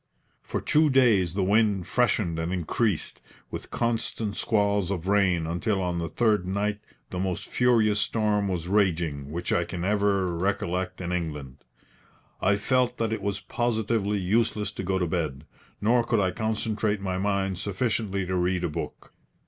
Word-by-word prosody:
For - - -3
two 155 0 +3
days 110 - +4
the 100 - +1
wind 100 -2 +2
freshened 95 -5 +1
and 80 +2 -2
increased, 90 +2 -1 0.3
with - - -6
constant 115 -2 -1
squalls 100 -3 +1
of 95 -2 -3
rain 95 -5 +3
until 90 +5 -1
on 90 -2 -1
the 85 -1 -3
third 105 -6 +1
night 105 +2 -1 0.3
the 90 - -3
most 95 -1 -2
furious 115 -4 +3
storm 105 -2 +1
was 90 -3 -2
raging 85 -8 +1
which 85 +3 -2
I 85 - +2
can 90 0 -4
ever 100 -3 +1
recollect 95 0 -1
in 90 0 -3
England. 75 -7 -4 0.8
I 100 +1 +3
felt 125 +3 +1
that 115 -1 0
it - - -3
was 100 -1 -2
positively 110 -1 0
useless 105 +2 +1
to 95 - -6
go 95 0 0
to 90 - +1
bed, 80 -5 -2 0.3
nor 120 +3 +3
could 115 -1 +1
I 95 -2 +2
concentrate 110 0 -1
my 95 -1 -2
mind 95 -2 0
sufficiently 100 -1 -1
to 95 +1 -2
read 90 0 +1
a 85 - 0
book. 75 - -6
100 Hz, 165 wpm, -26 LUFS, 90-110 Hz, 0.8 s, days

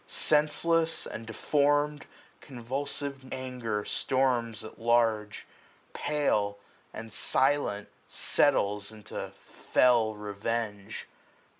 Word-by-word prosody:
Senseless, 160 +2 +2
and 115 0 -7
deform'd, 145 +5 +1 0.3
280 - - -16
Convulsive 135 +2 -4
anger 125 -5 -3
storms 125 -4 0
at 110 - -11
large; 115 -3 +2
or - - -27
pale. 105 -9 0 0.3
And 110 -1 -8
silent, 130 -7 +1 0.2
settles 100 +1 +1
into 110 -1 -7
fell 115 -4 +2
revenge. 105 0 -4
120 Hz, 90 wpm, -29 LUFS, 105-140 Hz, 0.3 s, Senseless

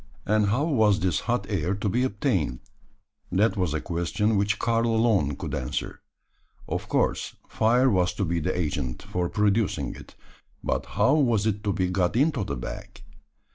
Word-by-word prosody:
And 105 0 +2
how 115 +8 +1
was 110 -11 +3
this 90 -5 +1
hot - - +1
air 95 +3 -1
to 105 +1 -3
be 120 +6 +1
obtained? 100 - -1 0.7
That 105 +6 +2
was 90 -6 0
a - - 0
question 90 +5 0
which 100 +2 +1
Karl 115 0 +1
alone 110 - +2
could - - -6
answer. 65 - -4 0.7
Of - - -4
course, - - 0
fire 120 +4 +3
was 90 -7 +2
to 100 - -1
be 85 0 0
the 90 +3 -1
agent 75 -7 -2
for 90 -1 -2
producing 105 -1 +1
it: - - -13 0.5
but - - -1
how 135 - +4
was 120 -9 +2
it 105 -1 -1
to 100 - +2
be 95 -1 0
got 90 +1 +1
into 140 -2 +2
the 100 - -3
bag? - - -8
100 Hz, 175 wpm, -26 LUFS, 90-115 Hz, 0.7 s, how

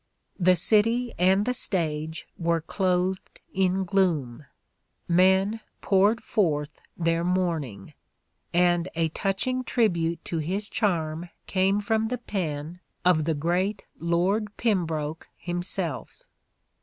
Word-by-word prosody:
The 185 0 +5
city 230 +7 +3
and 190 +3 +4
the 250 - 0
stage 160 -7 -1
were 170 -1 0
clothed 185 +2 -1
in 190 0 +1
gloom... 155 -9 0 0.6
Men 190 +5 +3 0.2
poured 205 +3 +3
forth 150 -7 -1 0.2
their 165 0 +1
mourning... 165 - -2 0.6
(and) 175 0 +2
a 165 -1 +1
touch 195 +4 -1
ing 255 0 -1
tribute 170 -10 0
to 165 - -2
his 190 +7 -2
charm 170 -4 -1 0.2
came 195 +1 +2
from 220 +1 0
the 250 +2 -2
pen 170 -7 -4 0.3
of 165 -4 +4
the 160 -1 0
great 180 +7 -1
Lord 190 +6 0
Pembroke 165 -8 -1
himself." 175 -4 -4
180 Hz, 115 wpm, -26 LUFS, 165-195 Hz, 0.6 s, The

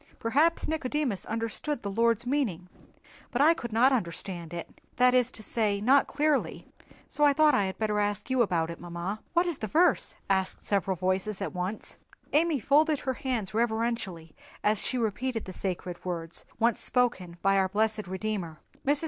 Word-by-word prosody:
Perhaps 295 +9 +2
Nicodemus 295 - -1
understood 230 +5 -3
the 200 - -3
Lord's 230 +2 +2
meaning, 225 - -1 0.6
but 245 - -2
I 310 +4 +6
could 235 -8 -6
not 240 +5 +5
understand 175 -5 -3
it—that 245 +8 0
is 250 -1 +4
to 220 - -4
say, 210 -2 0
not 265 +7 +4
clearly—so 295 0 -2
I 290 -1 +6
thought 305 +1 +5
that - - +3
I 200 - +2
had 190 - -4
better 210 -1 0
ask 205 0 -1
you 260 -1 +3
about 170 -6 +1
it, 170 - -8
mamma." 175 +4 -5
"What 345 +1 +3
is 345 -5 -3
the 215 - -3
verse?" 340 - +2
asked 190 -1 -1
several 195 -2 0
voices 185 +3 -1
at - - -3
once. 185 +4 -3 0.4
Amy 310 -1 +3
folded 300 +4 +3
her 260 - -1
hands 235 -7 -3
reverentially 220 -7 -1 0.3
as 210 0 +2
she 255 - -2
repeated 230 +1 -1
the 185 - -7
sacred 180 -1 -4
words 170 -2 -4
once 230 0 +2
spoken 190 -9 0
by 195 0 +4
our 190 -1 +2
blessed 215 0 0
Redeemer. 190 -4 -3 0.3
Mrs. 285 0 +2
220 Hz, 175 wpm, -28 LUFS, 190-260 Hz, 0.6 s, I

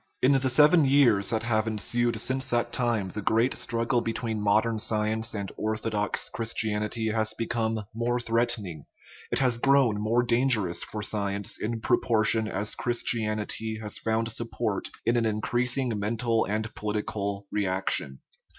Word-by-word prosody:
In 130 - +6
the 135 -1 +2
seven 150 +5 +6
years 135 -8 +4
that 110 -1 -1
have 110 -1 +1
ensued 115 +2 0
since 130 +3 -2
that 120 -1 0
time 115 -6 0
the 105 - -5
great 115 +5 +2
struggle 120 +1 0
between 115 -1 -3
modern 110 +2 +2
science 110 +1 0
and 100 -2 -4
orthodox 110 -1 -1
Christianity 110 0 -1
has 110 0 -1
become 115 -2 -2
more 120 +2 0
threatening; 115 -9 -1 0.5
it - - +1
has 125 -3 +2
grown 130 -6 +3
more 115 +3 +2
dangerous 120 -7 +2
for 105 0 -6
science 100 -2 -2
in 115 +1 -3
propor 110 -1 +2
tion 110 0 +1
as 105 0 -2
Christianity 110 -2 -1
has 105 -1 -4
found 110 0 0
support 115 -2 -2 0.2
in 115 +2 +2
an 115 -1 +2
increasing 120 +4 0
mental 115 +2 0
and 110 +2 -3
political 105 -1 -3
reaction. 95 -9 -1
110 Hz, 145 wpm, -27 LUFS, 105-120 Hz, 0.5 s, In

